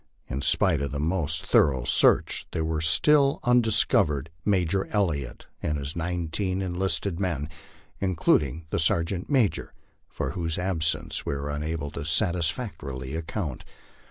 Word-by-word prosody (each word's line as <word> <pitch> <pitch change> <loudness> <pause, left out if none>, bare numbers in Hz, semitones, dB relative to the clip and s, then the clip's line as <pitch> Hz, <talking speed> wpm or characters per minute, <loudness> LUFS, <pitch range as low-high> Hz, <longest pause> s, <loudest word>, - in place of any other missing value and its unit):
In 65 +3 -4
spite 80 +1 +2
of 70 -1 -2
the 70 - -3
most 80 0 0
thorough 65 -4 +3
search, - - +3
there 80 - -1
were 80 -1 -1
still 140 - +4
undiscovered 100 - +2
Major 95 -1 +1
Elliott 80 - -2 0.2
and 75 -1 -3
nineteen 90 +3 -2
enlisted 90 0 -1
men, 85 -7 -1 0.5
including 80 -5 +1
the - - 0
sergeant 85 +3 0
major, 130 -8 +1 0.3
for 65 - -3
whose 85 0 -3
absence 85 -3 -1
we - - -2
were 70 +1 -4
unable 75 0 -3
to 75 - -6
satisfactorily 80 - -1
account. 80 - -4
85 Hz, 130 wpm, -26 LUFS, 75-95 Hz, 0.5 s, still